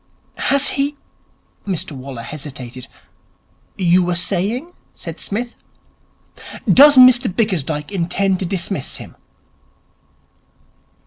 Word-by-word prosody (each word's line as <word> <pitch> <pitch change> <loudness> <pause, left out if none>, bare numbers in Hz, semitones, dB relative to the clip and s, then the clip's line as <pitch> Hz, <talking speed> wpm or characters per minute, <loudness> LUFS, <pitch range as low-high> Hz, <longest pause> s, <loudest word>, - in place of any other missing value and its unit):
'Has 280 0 +3
he 285 +1 -1 0.4
?' - - -39
Mr 185 -6 -2
Waller 130 -3 -8
hesitated. 130 -2 -8 0.9
'You 180 -1 +3
were 175 0 -1
saying?' 205 - -2 0.2
said - - -8
Psmith. 235 +4 -4 1.1
'Does 285 +1 +7
Mr 255 -3 +7
Bickersdyke 165 -7 -1
intend 190 +1 0
to 190 - -2
dismiss 180 -4 -3
him?' - - -10
185 Hz, 100 wpm, -19 LUFS, 155-240 Hz, 1.1 s, Does